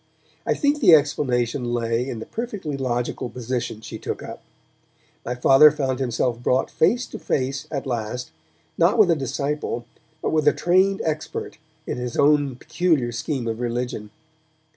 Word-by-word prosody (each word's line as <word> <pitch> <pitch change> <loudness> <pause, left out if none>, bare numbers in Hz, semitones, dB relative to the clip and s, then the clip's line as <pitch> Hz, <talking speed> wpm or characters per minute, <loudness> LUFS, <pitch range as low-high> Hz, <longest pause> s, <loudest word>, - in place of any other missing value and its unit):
I - - +2
think 290 0 +1
the 185 - +8
explanation 130 -4 +1
lay 115 +2 -1
in 120 - -4
the 110 - -6
perfectly 205 - -4
logical 125 -2 -2
position 125 -2 -4
she - - -8
took - - -5
up. - - -8 0.8
My 125 - -3
Father 135 +4 +7
found 135 -3 -2
himself 120 -1 -1
brought 125 +1 +1
face 240 +10 +2
to - - -9
face 135 +1 -2
at 140 -2 -4
last, 120 -2 -3 0.5
not 175 +7 +4
with 205 -6 +6
a - - +4
disciple, 140 -2 -3 0.3
but - - -2
with 155 -2 +1
a - - +6
trained 190 +2 +2
expert 155 -1 -4 0.3
in - - -3
his 125 -1 -4
own 145 -2 +3
peculiar 150 -3 0
scheme 120 +1 -3
of 115 0 -3
religion. 120 -3 -3
135 Hz, 160 wpm, -23 LUFS, 120-155 Hz, 0.8 s, the